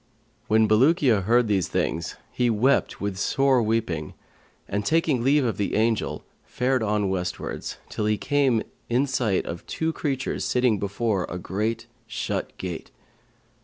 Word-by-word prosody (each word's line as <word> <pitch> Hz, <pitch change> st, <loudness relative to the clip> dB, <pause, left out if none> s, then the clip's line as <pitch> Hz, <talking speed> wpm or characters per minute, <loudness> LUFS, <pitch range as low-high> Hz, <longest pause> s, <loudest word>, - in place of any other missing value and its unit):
When 110 Hz, 0 st, +4 dB
Bulukiya 120 Hz, -, +4 dB
heard 120 Hz, +2 st, +4 dB
these 100 Hz, -4 st, +1 dB
things 85 Hz, 0 st, -2 dB, 0.2 s
he 120 Hz, -1 st, +1 dB
wept 120 Hz, +5 st, +2 dB
with 100 Hz, -2 st, -3 dB
sore 135 Hz, +3 st, +3 dB
weeping 105 Hz, -9 st, -1 dB, 0.5 s
and, 105 Hz, +1 st, -2 dB
taking 155 Hz, -3 st, +2 dB
leave 140 Hz, +1 st, +4 dB
of 115 Hz, -, -1 dB
the 100 Hz, -, -1 dB
Angel, 110 Hz, 0 st, 0 dB, 0.2 s
fared 130 Hz, 0 st, 0 dB
on 105 Hz, -2 st, +1 dB
westwards, 90 Hz, -1 st, -3 dB
till 105 Hz, -, -2 dB
he 105 Hz, 0 st, +2 dB
came 135 Hz, -5 st, +2 dB, 0.3 s
in 125 Hz, +4 st, +2 dB
sight 120 Hz, -8 st, 0 dB
of 85 Hz, +1 st, -6 dB
two 160 Hz, 0 st, -1 dB
creatures 135 Hz, -5 st, -2 dB
sitting 125 Hz, -4 st, +2 dB
before 100 Hz, -1 st, -1 dB
a -, -, -4 dB
great 105 Hz, +6 st, -2 dB, 0.2 s
shut 110 Hz, 0 st, -3 dB
gate. 90 Hz, -3 st, -5 dB
110 Hz, 145 wpm, -25 LUFS, 100-130 Hz, 0.5 s, When